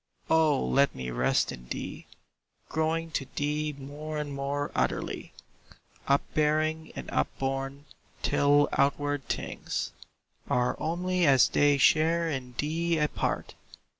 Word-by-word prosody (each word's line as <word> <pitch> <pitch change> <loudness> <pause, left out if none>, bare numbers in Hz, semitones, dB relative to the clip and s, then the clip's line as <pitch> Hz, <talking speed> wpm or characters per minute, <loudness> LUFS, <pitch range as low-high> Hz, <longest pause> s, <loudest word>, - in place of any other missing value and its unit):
O 160 -4 +4
let 140 +1 +3
me 65 -1 -4
rest 60 +1 +1
in - - -10
thee, - - -6 0.6
Growing 160 +1 -1
to 135 -3 -2
thee 150 +1 -1
more 150 +3 -6
and 150 -1 -3
more 140 +1 -2
utterly, 65 0 -2 0.8
Upbearing 155 +3 +1
and - - -6
upborn, 135 +1 -2 0.4
till 145 +1 +4
outward 145 -1 +1
things - - -3 0.6
Are 125 0 +2
only 180 +1 0
as 135 -3 +6
they 145 -1 +4
share 165 +4 +4
in 130 -5 -4
thee 165 +3 0
a 150 -1 +2
part! - - -2
145 Hz, 120 wpm, -28 LUFS, 135-155 Hz, 0.8 s, as